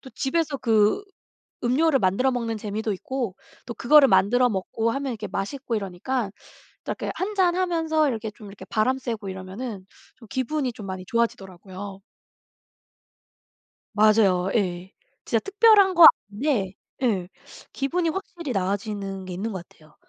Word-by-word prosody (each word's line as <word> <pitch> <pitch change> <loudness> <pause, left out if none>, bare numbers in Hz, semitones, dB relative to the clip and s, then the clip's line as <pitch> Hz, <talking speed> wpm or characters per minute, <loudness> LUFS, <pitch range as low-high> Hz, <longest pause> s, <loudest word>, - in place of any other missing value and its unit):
또 265 - -12
집에서 300 +2 -1
그 220 - +3 0.6
음료를 275 +4 +3
만들어 195 +8 +2
먹는 230 -2 -2
재미도 215 +1 -3
있고 245 0 -4 0.3
또 235 - -6
그거를 280 +4 +6
만들어 245 +5 +4
먹고 220 +2 -1
하면 275 -1 -2
이게 215 -1 -6
맛있고 240 +5 -4
이러니까 200 +4 -3 0.5
또 - - -5
이렇게 - - -4
1 405 +3 -3
잔 365 -3 +3
하면서 325 -4 +1
이렇게 225 -4 -3
좀 210 0 -13
이렇게 200 0 -11
바람 235 +4 +1
쐬고 225 -6 -5
이러면은 190 +3 -7 0.3
좀 230 - -15
기분이 260 +1 -2
좀 215 -3 -9
많이 190 -1 -6
좋아지더라고요. 195 -3 -4 1.9
맞아요 205 -4 +4
예. 185 -3 -1 0.3
진짜 - - +1
특별한 400 -1 +5
거 335 -1 +10 0.2
아닌데 210 -4 -1 0.3
예 195 -8 0 0.4
기분이 330 +5 -1
확실히 340 -4 -4
나아지는 195 0 -3
게 185 - -7
있는 210 +5 -3
것 180 -3 -7
같아요. 155 -1 -22
225 Hz, 315 characters per minute, -24 LUFS, 195-275 Hz, 1.9 s, 거